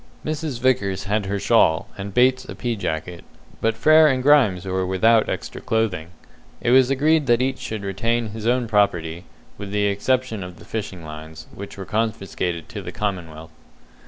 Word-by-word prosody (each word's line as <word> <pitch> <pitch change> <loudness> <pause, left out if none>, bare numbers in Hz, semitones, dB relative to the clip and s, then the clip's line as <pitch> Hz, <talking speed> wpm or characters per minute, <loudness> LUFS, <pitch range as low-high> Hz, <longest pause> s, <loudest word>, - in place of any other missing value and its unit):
Mrs. 155 -4 -3
Vickers 115 -7 +1
had 100 0 -1
her 100 +1 -1
shawl, 80 -3 +3
and 100 0 -6
Bates 130 +4 +3
a - - -8
pea 120 -1 -2
jacket, 85 -2 -4 0.4
but 115 0 +1
Frere 155 +6 +6
and 130 -3 +1
Grimes 125 -11 +4
were 95 0 -1
without 105 +5 +3
extra - - -5
clothing. 110 -8 -1 0.5
It 120 - 0
was 130 0 +6
agreed 150 +2 +2
that 120 -1 +4
each 130 +1 -1
should 110 -2 -5
retain 115 +4 -1
his 110 +1 -5
own 125 0 +2
property, 90 -5 0 0.3
with 100 -1 -6
the 105 0 0
exception 110 +1 0
of 90 -1 -9
the - - -14
fishing 100 -6 -5
lines, 80 +1 -9
which 100 0 -9
were 95 - -6
confiscated 95 -6 -2
to - - -6
the - - -7
commonwealth. 85 -6 -5
105 Hz, 175 wpm, -22 LUFS, 95-125 Hz, 0.5 s, Frere